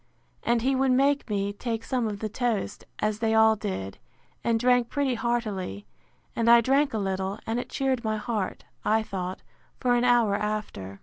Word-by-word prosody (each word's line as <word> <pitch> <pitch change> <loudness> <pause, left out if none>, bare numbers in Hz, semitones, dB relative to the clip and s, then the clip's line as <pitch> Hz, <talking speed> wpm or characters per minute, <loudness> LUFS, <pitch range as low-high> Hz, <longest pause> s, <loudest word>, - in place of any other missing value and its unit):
And 235 -1 +1
he 270 +2 +2
would 265 0 +2
make 275 +1 +2
me, 200 -1 -1
take 225 +1 -3
some 250 -3 -1
of 205 -2 -5
the 220 - -1
toast; 230 -1 -2
as 215 0 -1
they 225 -1 +1
all 220 0 +6
did, 190 - -5 0.4
and 230 -1 +2
drank 245 -1 +3
pretty 280 -3 0
heartily: 215 - -2 0.5
and 230 0 +2
I 235 0 +9
drank 275 +5 +2
a - - +1
little, 195 0 -2
and 225 +2 -1
it - - -6
cheered 265 -3 -1
my 215 -1 0
heart, 210 -3 -3 0.2
I 220 +1 +2
thought, 185 -3 -5 0.4
for 250 -2 +2
an 240 0 +2
hour 240 -4 +4
after. 200 - -4
225 Hz, 185 wpm, -27 LUFS, 205-245 Hz, 0.5 s, I